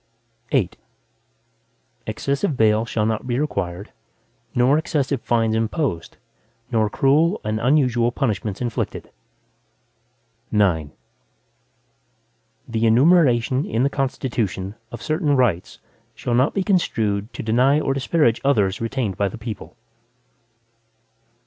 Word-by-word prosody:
VIII 110 -10 +2 1.4
Excessive 140 - -1
bail 110 0 +3
shall 110 -2 -1
not 110 +2 -2
be 120 -1 -1
required 100 -9 -3 0.6
nor 130 +5 +4
excessive 145 -5 -1
fines 115 -2 +1
imposed, 110 - -2 0.5
nor 110 -3 +2
cruel 155 - +2
and 110 0 -2
unusual 125 -2 +2
punishments 105 -6 -2
inflicted. 120 -2 -3 1.4
IX 90 -8 +2 1.8
The 115 0 0
enumeration 130 -1 +4
in 115 +3 -1
the 140 - +1
Constitution, 115 -8 -2 0.2
of 120 - -8
certain 155 -2 +1
rights, 115 -10 0 0.4
shall 120 - -3
not 130 +4 +2
be 195 - +1
construed 110 - 0
to - - -6
deny 125 +6 +3
or 135 - 0
disparage 135 -3 +1
others 105 -8 +1
retained 115 -4 -2
by 100 - +1
the 95 - -6
people. 110 -3 -8
120 Hz, 110 wpm, -22 LUFS, 110-140 Hz, 1.8 s, nor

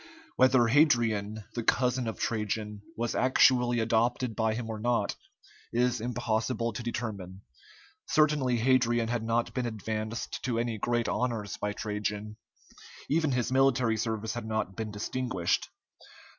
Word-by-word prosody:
Whether 130 -1 +5
Hadrian, 115 -6 +2
the 120 - -2
cousin 125 +1 +1
of 110 - -4
Trajan, 105 -1 -2 0.2
was 120 0 -1
actually 125 -2 +4
adopted 115 +1 +1
by 110 -1 +1
him 115 -1 -4
or 110 -1 -5
not, 120 +2 0 0.6
is 125 0 +1
impossible 115 0 -1
to 110 - -5
determine; 105 -6 -5 0.7
certainly 150 -5 +3
Hadrian 120 -1 +2
had 120 -1 -1
not 115 +1 0
been 125 -2 -1
advanced 110 +1 -4
to 125 -2 -1
any 115 -2 -1
great 120 +2 0
honors 115 -5 -1
by 105 0 -2
Trajan. 105 0 -4 0.7
Even 155 -2 +2
his 125 -1 0
military 130 -3 +3
service 110 0 -2
had 120 -3 -5
not 110 -3 -2
been 110 -1 -4
distinguished. 105 -3 -1
115 Hz, 135 wpm, -29 LUFS, 110-125 Hz, 0.7 s, Whether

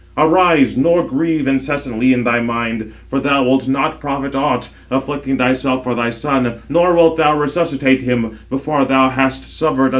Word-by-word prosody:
Arise, 165 -2 +4
nor 170 +6 +2
grieve 160 -4 -1
incessantly 135 -3 0
in 125 -1 +1
thy 120 0 +2
mind; 115 -2 -3 0.2
for 135 - -2
thou 140 0 +1
wilt 130 +1 +1
not 140 +4 -1
profit 140 -1 -4
aught, 140 +2 -1 0.2
afflicting 135 0 -3
thyself 130 +1 0
for 125 -1 -2
thy 120 0 -1
son, 125 0 -1
nor 175 +4 +2
wilt 165 -1 +4
thou 150 -1 +3
resuscitate 145 -3 0
him 115 -3 -2
before 140 +2 -1
thou 130 0 +3
hast 130 0 -1
suffered 155 - 0
another - - -3
misfortune." 135 0 +3
135 Hz, 175 wpm, -16 LUFS, 130-150 Hz, 0.2 s, Arise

